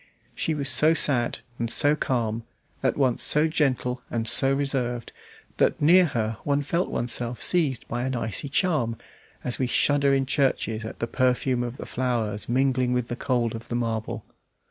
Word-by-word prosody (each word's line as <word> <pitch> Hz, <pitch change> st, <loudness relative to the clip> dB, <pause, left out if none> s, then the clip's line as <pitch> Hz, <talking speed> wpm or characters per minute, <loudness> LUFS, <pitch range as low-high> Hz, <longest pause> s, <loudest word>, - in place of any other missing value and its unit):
She 160 Hz, -, -1 dB
was 140 Hz, -2 st, -2 dB
so 155 Hz, +3 st, +4 dB
sad 125 Hz, -6 st, +2 dB, 0.2 s
and 115 Hz, -1 st, -1 dB
so 145 Hz, +4 st, +3 dB
calm, 115 Hz, -6 st, -1 dB, 0.4 s
at -, -, 0 dB
once 130 Hz, -4 st, +1 dB
so 150 Hz, +2 st, +3 dB
gentle 130 Hz, -5 st, 0 dB
and 115 Hz, -1 st, -2 dB
so 135 Hz, +4 st, +4 dB
reserved, 130 Hz, -4 st, -2 dB, 0.4 s
that -, -, +2 dB
near 175 Hz, +5 st, +6 dB
her 110 Hz, -5 st, -2 dB
one 145 Hz, 0 st, 0 dB
felt 170 Hz, +5 st, -1 dB
oneself 120 Hz, 0 st, -2 dB
seized 150 Hz, -9 st, 0 dB
by 120 Hz, +1 st, -3 dB
an 130 Hz, 0 st, -2 dB
icy 115 Hz, +3 st, -2 dB
charm, 140 Hz, -, 0 dB, 0.5 s
as 125 Hz, -, -2 dB
we 130 Hz, -, +1 dB
shudder 140 Hz, +2 st, +2 dB
in 135 Hz, -1 st, +2 dB
churches 130 Hz, -5 st, 0 dB
at 110 Hz, -, -7 dB
the -, -, -2 dB
perfume 125 Hz, 0 st, +1 dB
of 120 Hz, +1 st, -4 dB
the -, -, -7 dB
flowers 115 Hz, -5 st, -2 dB
mingling 130 Hz, 0 st, +1 dB
with 125 Hz, -1 st, -1 dB
the 120 Hz, -, -2 dB
cold 120 Hz, -3 st, -1 dB
of 115 Hz, 0 st, -7 dB
the 120 Hz, -, -2 dB
marble. 115 Hz, -1 st, -3 dB
125 Hz, 175 wpm, -25 LUFS, 115-140 Hz, 0.5 s, near